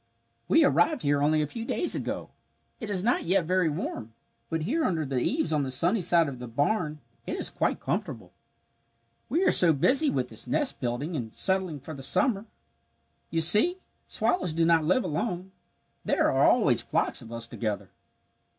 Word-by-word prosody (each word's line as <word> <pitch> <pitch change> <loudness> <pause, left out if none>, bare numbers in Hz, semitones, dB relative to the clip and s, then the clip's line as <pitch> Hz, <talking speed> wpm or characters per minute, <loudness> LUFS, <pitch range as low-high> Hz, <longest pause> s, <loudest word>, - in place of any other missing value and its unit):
"We - - +4
arrived 170 +5 +1
here 145 0 +1
only 155 +1 +2
a - - -4
few 225 +10 -7
days 340 +8 +1
ago. - - -4 0.5
It 220 -5 -7
is 190 -3 0
not 240 +3 0
yet 185 0 +1
very 180 -1 +1
warm, 130 - -6 0.4
but 160 -1 -3
here 305 - -1
under 160 -4 -1
the 135 -2 -2
eaves 280 - -1
on 150 - +1
the 135 - -3
sunny 175 - +1
side 170 -2 +3
of 130 -3 -7
the 125 - -8
barn 150 - -2 0.3
it - - -3
is - - -1
quite - - -2
comfortable. - - -5 1.0
"We 325 +10 0
are - - +3
so 170 -3 +6
busy 275 - +2
with - - -2
this - - -7
nest 290 -4 +1
building 125 +7 -3
and 115 -6 -5
settling 190 - +2
for 160 +4 -9
the 140 - -9
summer. 215 - +1 0.8
You 165 - -1
see 210 - +7
we 375 - -25 0.3
swallows 330 - -1
do 165 +1 +1
not 165 -1 +3
live 185 +10 +1
alone. 180 +4 -4 0.5
There - - +1
are - - +2
always - - +2
flocks - - -1
of 115 - -13
us 115 0 -5
together. 110 -3 -5
165 Hz, 185 wpm, -26 LUFS, 145-205 Hz, 1.0 s, see